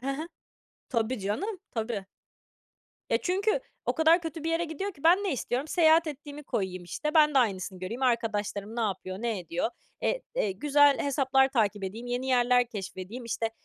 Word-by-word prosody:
Hı 270 +2 -2
hı, 310 +5 -4 0.6
tabii 235 -1 0
canım, 365 - -2
tabii. 220 -3 -3 1.1
E, - - +3
çünkü 400 +6 +1 0.3
o - - +1
kadar 325 +2 +5
kötü 325 -1 -6
bir 330 - 0
yere 335 +1 +1
gidiyor 340 +6 -4
ki 280 - -19
ben 345 +3 +7
ne 385 - 0
istiyorum, 260 +2 -2
seyahat 325 0 +5
ettiğimi 295 0 -7
koyayım, 185 -5 -3
işte, 300 - -3
ben 300 -1 +5
de 270 - +6
aynısını 190 -5 0
göreyim, 225 +8 -5
arkadaşlarım 220 -3 -1
ne 235 - -1
yapıyor, 190 -3 -2
ne 230 -4 -1
ediyor. 175 +4 -2 0.3
Eee, - - 0
eee, 205 - 0
güzel 290 +6 +4
hesaplar 270 -1 +3
takip 215 -6 0
edeyim, 220 +6 -6
yeni 245 +2 -2
yerler 245 -1 +3
keşfedeyim, 205 +2 -7
işte, 225 0 -2
250 Hz, 175 wpm, -28 LUFS, 210-305 Hz, 1.1 s, ben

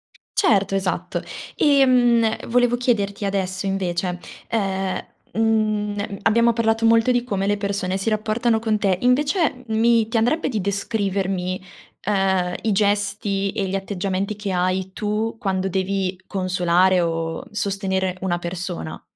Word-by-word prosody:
C - - -24 0.3
certo, 200 -3 +3
esatto, 190 -1 -2 0.3
ehm, 245 -5 +3
volevo 245 0 +3
chiederti 205 -5 0
adesso 190 -1 -2
invece, 180 -2 -1 0.3
ehm, 195 -3 -1 0.3
uhm, 210 -2 0
abbiamo 235 +1 +4
parlato 225 0 +1
molto 230 +2 +4
di 245 -1 +1
come 200 -5 -2
le 205 0 +1
persone 200 -2 -2
si 195 +4 -1
rapportano 220 +2 +1
con 220 -1 0
te, 195 -3 +1
invece 280 +2 +2
m 220 - -3
mi 230 -1 +4
ti 225 - -1
andrebbe 245 +9 +1
di 215 -5 -1
descrivermi, 195 -2 -1 0.4
ehm, 190 -3 +1
i 220 - 0
gesti 200 -1 0
e 200 - -2
gli 190 - -2
atteggiamenti 195 +1 -2
che 205 -1 -4
hai 185 +1 0
tu 215 +2 -2
quando 190 -3 -1
devi 190 0 -1
consolare 185 -1 +2
o 165 -1 -2
sostenere 190 -2 -1
una 175 -2 0
persona? 175 - -5
200 Hz, 140 wpm, -22 LUFS, 190-225 Hz, 0.4 s, abbiamo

